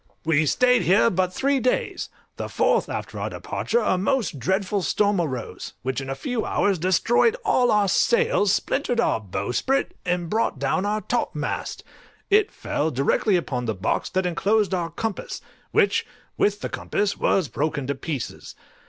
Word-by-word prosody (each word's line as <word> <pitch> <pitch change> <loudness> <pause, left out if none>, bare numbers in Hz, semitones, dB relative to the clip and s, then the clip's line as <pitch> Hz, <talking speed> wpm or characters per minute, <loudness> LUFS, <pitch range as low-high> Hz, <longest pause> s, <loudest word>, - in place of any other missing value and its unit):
We 155 -1 +3
stayed 250 - +4
here 200 +5 +4
but 185 0 0
three 275 +7 +1
days; 250 0 -1 0.3
the - - -4
fourth - - +2
after - - -5
our - - -2
departure 475 - -1
a 185 - +1
most 210 - 0
dreadful 195 - 0
storm 200 +3 +1
arose, 130 -8 -5
which 130 +1 -2
in 135 - -7
a 135 - -2
few 245 - -2
hours 195 -4 +1
destroyed 230 - +3
all 245 -1 +3
our 210 -1 +3
sails, 470 - +3
splintered 245 +2 0
our 235 - +2
bowsprit, 110 - -1
and 175 -1 -1
brought 220 -4 0
down 140 +9 0
our 215 +1 0
topmast; - - -3 0.5
it 420 +1 +5
fell 155 - -2
directly 145 - +1
upon 130 -8 -1
the 110 -2 -1
box 95 +3 -1
that 185 0 0
enclosed 200 +4 +1
our 175 -2 -1
compass, 205 +5 -4 0.3
which, 435 -3 +3 0.3
with 205 0 +1
the - - -3
compass, 205 -1 -1
was 185 -6 +2
broken 145 +2 -2
to 140 - -1
pieces. 140 -2 -6
190 Hz, 160 wpm, -24 LUFS, 150-225 Hz, 0.5 s, it